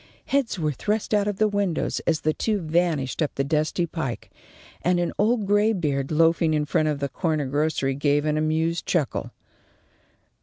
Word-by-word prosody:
Heads 275 -7 0
were 155 -3 0
thrust 210 - -2
out 205 -1 +2
of 205 -2 -2
the 215 - +3
windows 200 -5 -1
as 160 -2 +1
the 155 - +1
two 215 +5 0
vanished 165 -5 0
up 150 - -1
the 135 - 0
dusty 155 +4 0
pike, 155 -7 -5 0.5
and 180 0 +2
an 175 - -1
old 220 0 +2
graybeard 190 -10 +1
loafing 165 0 +3
in 150 -1 0
front 155 +1 +1
of 150 -1 0
the 140 - -1
corner 155 -2 -1
grocery 140 0 0
gave 145 +1 +1
an 155 0 +1
amused 160 +2 0
chuckle. 155 -8 -1
160 Hz, 175 wpm, -24 LUFS, 150-190 Hz, 0.5 s, the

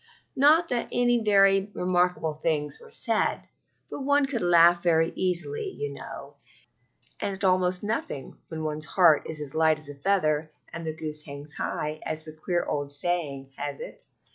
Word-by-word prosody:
Not 310 +5 +5
that 240 -1 -1
any 245 -1 +2
very 195 -1 +4
remarkable 180 -3 +1
things 150 -1 -1
were 465 - -15
said, 455 - 0 0.4
but - - -5
one 285 +1 +3
can 235 -10 -1
laugh 170 0 +6
very 165 -2 +3
easily, 285 - -1
you 435 0 -4
know, - - -10 0.8
and 200 - -2
at 190 - -8
almost 185 0 +2
nothing, 205 - -4
when 160 -1 -6
one's 155 0 -1
heart 170 -5 +4
is 150 -3 -6
light 160 -1 +3
as 155 -1 -12
a - - -6
feather 155 -1 0 0.2
and 165 0 -6
the 155 - -3
"goose 155 -1 -4
hangs 145 +1 -8
high," 150 0 -3
as 155 0 -4
the 155 0 -10
queer 175 +2 -1
old 145 -1 -3
saying 145 -3 -2
has 145 -1 -5
it. - - -9
170 Hz, 165 wpm, -26 LUFS, 155-195 Hz, 0.8 s, laugh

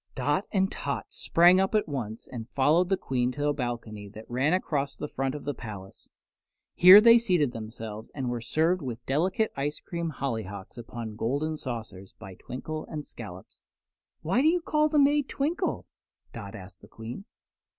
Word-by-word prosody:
Dot 145 +8 0
and 190 -1 +1
Tot 140 0 -3
sprang 175 +2 +5
up 190 +3 +1
at 210 - +2
once 115 -7 -5
and 115 -2 -8
followed 155 +8 +3
the 195 - +2
Queen 125 -6 -1
to 145 +1 0
a - - +2
balcony 115 -6 -5
that 110 +2 -11
ran 130 +5 +1
across 145 -6 -1
the 150 - -4
front 135 -1 -2
of 145 - -7
the 145 - -2
palace. 100 -6 -10 0.6
Here 185 +3 +10
they 230 +1 +8
seated 180 - +2
themselves 110 -1 -7
and 135 -3 -3
were 120 -1 -2
served 160 +9 +1
with 120 -3 -6
delicate 185 - +1
ice 145 +2 -2
cream 170 -1 -4
hollyhocks 110 -10 -5
upon 115 -2 -7
golden 145 +8 -1
saucers 110 -9 -7
by 95 - -10
Twinkle 155 +10 -6
and 150 -2 -6
Scollops. 95 -6 -10 0.6
"Why 190 +11 +2
do 300 - +4
you 345 +2 +3
call 305 -1 +2
the 300 - +1
maid 290 0 +4
Twinkle?" 300 +6 -1 0.5
Dot 100 -4 -8
asked 95 0 -11
the - - -15
Queen. 115 - -8
140 Hz, 175 wpm, -28 LUFS, 115-175 Hz, 0.6 s, Here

